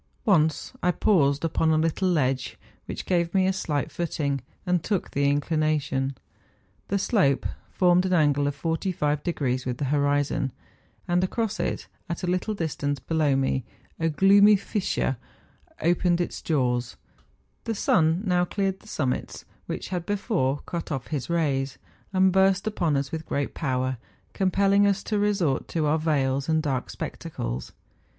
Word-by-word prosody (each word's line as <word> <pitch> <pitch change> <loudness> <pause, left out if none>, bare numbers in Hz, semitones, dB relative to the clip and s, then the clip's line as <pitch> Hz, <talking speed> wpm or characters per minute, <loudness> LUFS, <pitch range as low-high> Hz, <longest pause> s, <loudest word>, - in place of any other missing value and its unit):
Once 160 - +2
I 180 - +2
paused 155 -6 +2
upon 160 0 +1
a 160 - +3
little 165 +4 +1
ledge, 130 -6 0 0.3
which - - -5
gave 170 -1 0
me 190 -1 +4
a 190 - +2
slight 150 -6 -2
footing, 145 -5 -2 0.2
and 180 -2 +1
took 200 -4 -1
the 140 0 +2
inclination. 145 -3 0 0.7
The 200 - 0
slope 185 - +2 0.2
formed 180 0 +3
an 185 - 0
angle 145 -4 +3
of 145 0 -4
45° 150 -5 -1
with 125 -1 -2
the 145 - -2
horizon; 145 -2 +1 0.5
and 175 +1 +2
across 220 +3 -1
it, - - -2 0.2
at 170 - -4
a - - -1
little 185 +4 0
distance 145 -5 -2
below 155 0 +1
me, 135 -1 0 0.4
a 165 0 +1
gloomy 200 +6 +6
fissure 195 - -1 0.7
opened 175 +1 +2
its 175 - -2
42 165 - -3
MOUNTAIN 125 -2 +2
ADVENTURES. 120 -1 -4
jaws. - - -31 0.7
The 225 - -2
sun 165 -1 +2
now 180 -2 +2
cleared 195 +1 -1
the - - -19
summits 130 -10 -3 0.2
which - - -5
had 180 -2 -3
before 195 - 0
cut 170 -2 -5
off 135 -3 -4
his 145 -2 -3
rays, 140 -6 0 0.3
and 190 0 +4
burst 190 0 +3
upon 170 -9 0
us 140 0 -2
with 160 -1 -5
great 140 -1 -2
power, 130 -3 -1 0.4
compelling 200 +1 +3
us 200 0 +1
to 210 -2 -1
resort 195 -9 +1
to 160 -2 -1
our 155 +2 +2
veils 140 -3 0
and 160 -1 +2
dark 135 -4 -2
spectacles. - - -5
160 Hz, 160 wpm, -26 LUFS, 140-185 Hz, 0.7 s, gloomy